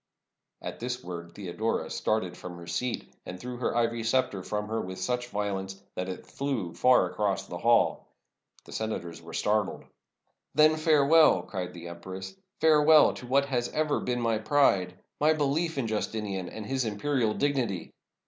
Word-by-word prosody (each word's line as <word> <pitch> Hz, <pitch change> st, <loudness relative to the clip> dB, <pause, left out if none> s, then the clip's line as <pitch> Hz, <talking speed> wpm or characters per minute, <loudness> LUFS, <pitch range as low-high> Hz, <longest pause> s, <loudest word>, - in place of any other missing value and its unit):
At -, -, -6 dB
this 125 Hz, +1 st, -4 dB
word 85 Hz, -1 st, -7 dB
Theodora 105 Hz, +3 st, -2 dB
started 95 Hz, -5 st, -1 dB
from 90 Hz, -1 st, -8 dB
her 85 Hz, -, -10 dB
seat, 115 Hz, +8 st, -3 dB
and 90 Hz, 0 st, -8 dB
threw 125 Hz, +2 st, -6 dB
her 120 Hz, -, -1 dB
ivory 115 Hz, -1 st, +1 dB
scepter 115 Hz, -4 st, +1 dB
from 105 Hz, +2 st, -3 dB
her 110 Hz, +1 st, -1 dB
with 95 Hz, 0 st, -6 dB
such 125 Hz, 0 st, -1 dB
violence 95 Hz, -3 st, -3 dB
that 90 Hz, +1 st, -3 dB
it 95 Hz, -, -6 dB
flew 125 Hz, -12 st, -3 dB
far 125 Hz, -6 st, +5 dB
across 95 Hz, +1 st, -1 dB
the -, -, -7 dB
hall. -, -, +3 dB, 0.6 s
The -, -, -13 dB
senators 85 Hz, -7 st, -4 dB
were 80 Hz, 0 st, -9 dB
startled. 105 Hz, -1 st, 0 dB, 0.7 s
"Then, 155 Hz, +1 st, +6 dB
farewell," 155 Hz, 0 st, +5 dB
cried 90 Hz, -2 st, -5 dB
the 85 Hz, 0 st, -8 dB
empress; 95 Hz, -, -8 dB
" 190 Hz, -, -41 dB
farewell 155 Hz, -1 st, +6 dB
to 125 Hz, -, -9 dB
what 140 Hz, +2 st, +3 dB
has 125 Hz, -3 st, -1 dB
ever 155 Hz, -1 st, +1 dB
been 125 Hz, -1 st, -2 dB
my 115 Hz, -2 st, +1 dB
pride 100 Hz, -8 st, +2 dB
— -, -, -38 dB
my 155 Hz, +1 st, +5 dB
belief 155 Hz, +2 st, 0 dB
in 135 Hz, -, 0 dB
Justinian 105 Hz, -4 st, -2 dB
and 110 Hz, -, -7 dB
his 130 Hz, +2 st, -1 dB
imperial 110 Hz, +1 st, 0 dB
dignity! 130 Hz, -11 st, -1 dB
110 Hz, 170 wpm, -28 LUFS, 95-135 Hz, 0.7 s, Then